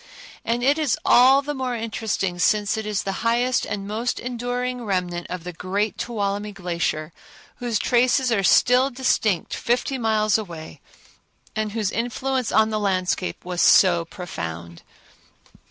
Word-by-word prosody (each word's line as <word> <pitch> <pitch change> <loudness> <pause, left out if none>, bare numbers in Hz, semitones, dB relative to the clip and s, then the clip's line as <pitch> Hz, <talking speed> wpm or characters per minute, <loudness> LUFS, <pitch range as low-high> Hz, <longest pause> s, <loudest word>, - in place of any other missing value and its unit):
And 235 +1 -1
it 285 +4 +3
is 305 -3 +1
all 265 +3 +6
the 295 +1 -3
more 260 -3 -3
interesting 220 -5 -2
since 210 +2 +2
it 220 -1 -4
is 210 -2 -1
the 195 - -2
highest 240 +2 +1
and 200 -1 -4
most 225 +4 -2
enduring 245 0 -3
remnant 180 -4 -2
of 180 -2 -5
the 180 0 -6
great 195 +5 -2
Tuolumne 205 -2 -2
Glacier, 170 -4 -3 0.4
whose 240 -3 -1
traces 250 +3 +2
are 215 -4 +2
still 250 +7 +4
distinct 240 -7 0
fifty 250 +2 -1
miles 215 -2 +2
away, 170 -6 -9 0.7
and 215 -1 -2
whose 215 -3 -1
influence 250 +1 -2
on 220 0 +3
the 215 - -1
landscape 185 -3 -1
was 180 -1 -2
so 175 -3 +5
profound. 85 - -7
215 Hz, 145 wpm, -23 LUFS, 185-245 Hz, 0.7 s, all